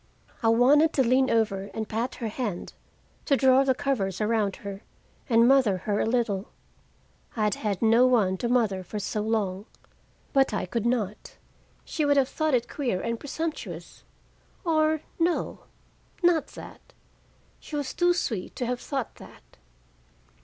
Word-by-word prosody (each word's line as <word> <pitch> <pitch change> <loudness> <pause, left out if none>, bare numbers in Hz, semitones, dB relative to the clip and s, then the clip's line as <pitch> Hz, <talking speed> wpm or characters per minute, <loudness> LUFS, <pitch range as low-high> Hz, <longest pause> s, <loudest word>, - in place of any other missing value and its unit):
I 230 - +1
wanted 275 +8 +5
to 270 - +3
lean 255 +2 +3
over 205 -3 0
and 220 -1 -3
pat 230 +4 -2
her 235 - -4
hand, 210 -5 -4 0.5
to 275 - +3
draw 265 0 +5
the 265 -1 +2
covers 200 -10 -1
around 215 -2 +1
her 200 0 -6 0.5
and 230 0 +5
mother 255 -8 +4
her 205 +3 -2
a - - +1
little, 225 -5 0 0.9
I 220 - 0
had 210 -1 +2
had 200 -4 -3
no 230 +3 +5
one 205 -7 +2
to 235 - -2
mother 220 -7 +1
for 210 - -7
so 210 +1 -2
long, 210 -2 -1 0.7
but 270 -5 +3
I - - -1
could 225 +5 -2
not. 215 -4 -2 0.5
She 310 - -2
would 285 -1 +3
have 270 -1 +3
thought 310 -3 0
it 240 -1 0
queer 245 -11 -2
and 230 +3 -3
presumptuous 320 +2 -6 0.6
or 315 -2 +2 0.2
no, 335 +1 -1 0.6
not 330 -4 +3
that. - - -13 0.7
She 305 - -8
was 290 -3 -3
too 350 0 +3
sweet 220 - -3
to 250 - -2
have 245 0 -2
thought 270 -5 -4
that. - - -16
235 Hz, 160 wpm, -26 LUFS, 210-270 Hz, 0.9 s, wanted